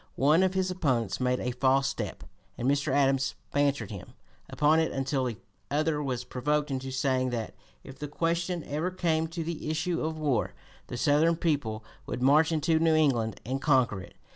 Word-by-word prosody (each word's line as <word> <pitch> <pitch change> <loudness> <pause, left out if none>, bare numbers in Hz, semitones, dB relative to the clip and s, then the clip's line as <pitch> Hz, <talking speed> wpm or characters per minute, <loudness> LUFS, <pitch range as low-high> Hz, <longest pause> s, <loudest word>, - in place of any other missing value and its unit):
One 150 +6 +4
of 190 0 +1
his 190 -1 +1
opponents 130 - 0
made 125 0 +1
a 125 - -2
false 135 +2 +2
step, - - -4 0.3
and 120 - -2
Mr. 140 +1 +1
Adams 135 -1 +2 0.2
"bantered 140 -7 +1
him" 100 -4 -9 0.4
upon 150 +2 +3
it 160 - +1
until 135 0 -1
the 120 -4 -3 0.3
other 150 +1 0
was 125 -4 -2
provoked 150 +4 -1
into 135 0 -3
saying 130 -1 0
that, 115 -3 -4 0.3
"if 135 0 -12
the 150 - -4
question 170 +3 -1
ever 155 +5 -2
came 165 -3 0
to 165 0 -4
the 160 -1 -4
issue 165 +2 -1
of 160 0 -2
war, 140 -8 0 0.3
the 125 - -5
Southern 155 +5 +3
people 135 -10 -1 0.2
would 125 - -3
march 150 +4 +5
into 160 0 +2
New 160 -1 +3
England 120 -9 +1
and 135 +3 -2
conquer 130 -9 +2
it." - - -13
145 Hz, 185 wpm, -28 LUFS, 130-160 Hz, 0.4 s, march